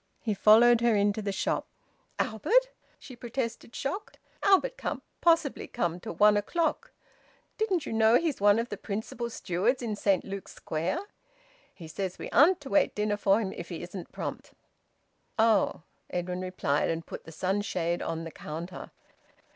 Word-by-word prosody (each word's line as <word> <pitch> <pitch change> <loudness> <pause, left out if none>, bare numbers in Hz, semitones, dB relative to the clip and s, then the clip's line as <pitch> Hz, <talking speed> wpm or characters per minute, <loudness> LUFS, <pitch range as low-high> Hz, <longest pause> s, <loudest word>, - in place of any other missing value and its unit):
He 220 - 0
followed 225 +4 +6
her 235 -2 +4
into 205 +1 +2
the 200 -1 -2
shop. 195 - -1 0.5
"Albert!" 465 - +2 0.3
she 255 - -11
protested, 235 -1 -5
shocked. 390 +11 -4 0.2
"Albert 400 +6 +4
can't - - -4 0.2
possibly 330 -4 +2
come 175 -7 -2
till 175 - -7
one 210 +4 +6
o'clock. 320 +11 -1 0.7
Didn't 385 -7 +1
you - - -4
know 225 +1 +5
he's 320 -10 -1
one 205 +1 +6
of 230 +1 -1
the 205 - -5
principal 220 +4 -4
stewards 225 +5 -1
in 220 -3 -2
Saint 200 -2 +2
Luke's 195 0 -7
Square? 165 - -2 0.8
He 170 -4 -10
says 185 +3 -4
we - - -7
aren't 340 +6 +5
to 275 - -8
wait 295 - +3
dinner 210 0 0
for 200 0 +3
him 195 -3 -3
if 170 - -8
he 170 - -6
isn't 180 0 -8
prompt." - - -6 0.8
"Oh!" 220 -7 +3 0.3
Edwin 180 +1 -3
replied, 160 -6 0
and 165 0 -2
put - - -8
the 165 - -10
sunshade 180 -1 -1
on 165 0 -3
the 165 - -7
counter. 170 +5 -7
210 Hz, 165 wpm, -29 LUFS, 180-240 Hz, 0.8 s, followed